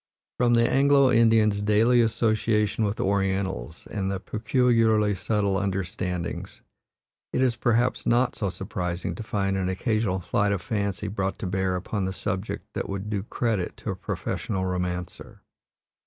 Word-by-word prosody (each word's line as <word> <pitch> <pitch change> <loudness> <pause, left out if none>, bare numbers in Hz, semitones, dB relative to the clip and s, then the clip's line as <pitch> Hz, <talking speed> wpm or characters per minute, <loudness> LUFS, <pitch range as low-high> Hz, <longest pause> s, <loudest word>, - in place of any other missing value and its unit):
From 120 -1 +4
the 115 0 +4
Anglo 140 0 +4
Indians' 110 -3 +4
daily 110 +4 +4
association 110 -1 +1
with 105 +1 -2
Orientals 95 -4 -1
and 95 -2 -2
their 95 - -1
peculiarly 110 -1 +2
subtle 100 +1 0
understandings, 90 -3 -3 0.7
it - - -1
is 130 -2 +2
perhaps 120 +2 +1
not 125 +2 +2
so 100 -4 -1
surprising 90 -1 -4
to 85 - -7
find 100 -3 -1
an 95 -1 -1
occasional 100 0 0
flight 100 +3 +1
of 95 - -2
fancy 100 -1 -2
brought 95 -1 -2
to - - -5
bear 95 0 0
upon 95 +2 -2
the 95 - -2
subject 95 +2 -4
that - - -3
would 100 +2 -4
do 100 -2 -1
credit 105 -2 -2
to - - -4
a - - -4
professional 95 -3 -3
romancer. 90 -1 -4
100 Hz, 150 wpm, -26 LUFS, 95-115 Hz, 0.7 s, From